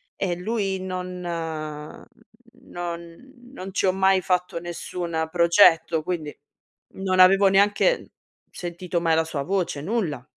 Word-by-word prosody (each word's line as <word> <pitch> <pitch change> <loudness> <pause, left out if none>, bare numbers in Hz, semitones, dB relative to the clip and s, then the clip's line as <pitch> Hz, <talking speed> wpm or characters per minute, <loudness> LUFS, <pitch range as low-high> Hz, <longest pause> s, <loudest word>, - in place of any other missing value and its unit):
e 180 -3 -1
lui 195 0 -2
non 185 -1 -5 1.5
non 170 +7 -7 0.2
non 190 -6 -8
ci - - +1
ho - - +4
mai 190 0 +3
fatto 180 -1 -1
nessuna 170 -1 -4
progetto, 170 -1 +4
quindi 165 -5 -3 0.6
non 190 -1 -1
avevo 195 +2 +7
neanche 205 - +2 0.4
sentito 175 0 -4
mai 165 -1 +2
la 160 - +3
sua 155 -3 -4
voce, 180 -3 -2
nulla. 165 - -2
180 Hz, 120 wpm, -24 LUFS, 170-190 Hz, 1.5 s, avevo